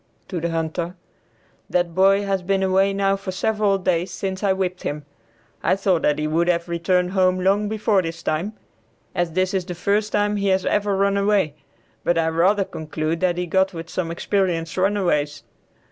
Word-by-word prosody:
(To 180 -4 -3
the 170 - -1
hunter.) 165 +2 -2 0.7
"That 175 -1 0
boy 195 +3 +4
has 195 -1 -1
been 195 +1 0
away 190 +1 +3
now 195 0 +1
for 195 -1 -7
several 205 +1 +1
days 180 -1 0
since 190 +1 -4
I 200 - +3
whipped 185 -1 -1
him. 145 0 -4 0.6
I - - +2
thought 190 -4 +1
that 150 - +2
he 150 - -1
would 165 +3 +1
have 170 -1 +1
returned 180 +1 +1
home 185 -1 +2
long 200 +3 +2
before 215 -2 +2
this 165 -1 -6
time, 165 +8 -1 0.6
as 175 -2 -1
this 185 +2 +1
is 190 -2 0
the 180 -1 -6
first 205 +4 0
time 205 0 +1
he 200 0 -1
has 190 -1 +2
ever 205 -1 +1
run 200 0 +2
away; 200 -6 +2 0.5
but 175 - +1
I 165 -1 +2
rather 185 +5 +3
conclude 155 0 -3
that 175 -1 +1
he 180 - -1
got 190 +2 +1
with 165 0 -7
some 175 -3 -2
experienced 170 -1 -1
runaways. 175 -7 0
185 Hz, 190 wpm, -22 LUFS, 170-195 Hz, 0.7 s, boy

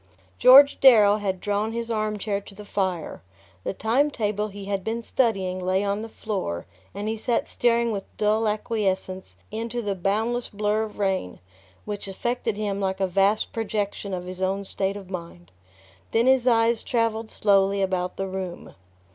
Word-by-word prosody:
George 280 +2 +8
Darrow 215 -6 +7
had 195 -3 -2
drawn 205 +3 -1
his 235 0 -3
armchair 215 -2 -1
to 200 - -13
the 210 +1 -10
fire. 190 -5 -2 0.4
The - - -2
time 250 +9 +2
table 210 -5 -1
he 200 -1 -9
had 195 -1 -2
been 230 +3 -3
studying 195 -8 0
lay 185 +2 0
on 200 +1 -1
the 225 - -7
floor, 190 - -4 0.3
and 205 +1 -4
he 220 - -1
sat 235 +1 0
staring 235 -1 +1
with 200 -2 -4
dull 215 +1 +2
acquiescence 200 -3 -2 0.2
into 230 +2 -3
the 205 -4 -1
boundless 220 +6 -1
blur 210 +1 0
of 215 - -11
rain, 190 - -1 0.5
which 205 -1 -5
affected 225 +2 -2
him 205 -2 -2
like 190 -1 -1
a 195 - +2
vast 195 +3 +1
projection 205 -2 -3
of 180 -1 -4
his 185 +1 -7
own 195 +1 -1
state 195 +1 -1
of 190 -2 -11
mind. 170 - -8 0.6
Then 230 +1 +2
his 260 -1 +4
eyes 230 -1 +3
travelled 230 -2 -1
slowly 195 -1 +2
about 180 -1 -2
the 195 - -2
room. 185 -2 -6
205 Hz, 170 wpm, -25 LUFS, 195-225 Hz, 0.6 s, George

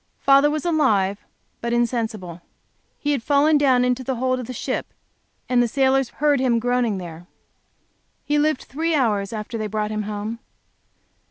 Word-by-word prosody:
Father 275 +1 +5
was 305 +2 -3
alive 215 - +2 0.4
but 235 0 -2
insensible. 225 -7 -2 0.6
He 295 - -1
had 280 -4 0
fallen 290 +4 +3
down 255 -3 +3
into 250 +1 0
the 265 +1 -2
hold 255 +1 0
of 245 - -6
the - - -5
ship, - - -3 0.6
and 250 -1 +3
the 240 - +2
sailors 265 +1 +2
heard 290 -2 +1
him 250 -2 +2
groaning 245 -3 0
there. 175 -1 -9 1.0
He 295 0 +1
lived 305 -2 +1
three 325 +4 -2
hours 210 -8 +1
after 220 +1 -5
they 215 - -2
brought 210 0 -2
him 215 0 -2
home. 210 +2 -4
245 Hz, 165 wpm, -22 LUFS, 215-275 Hz, 1.0 s, Father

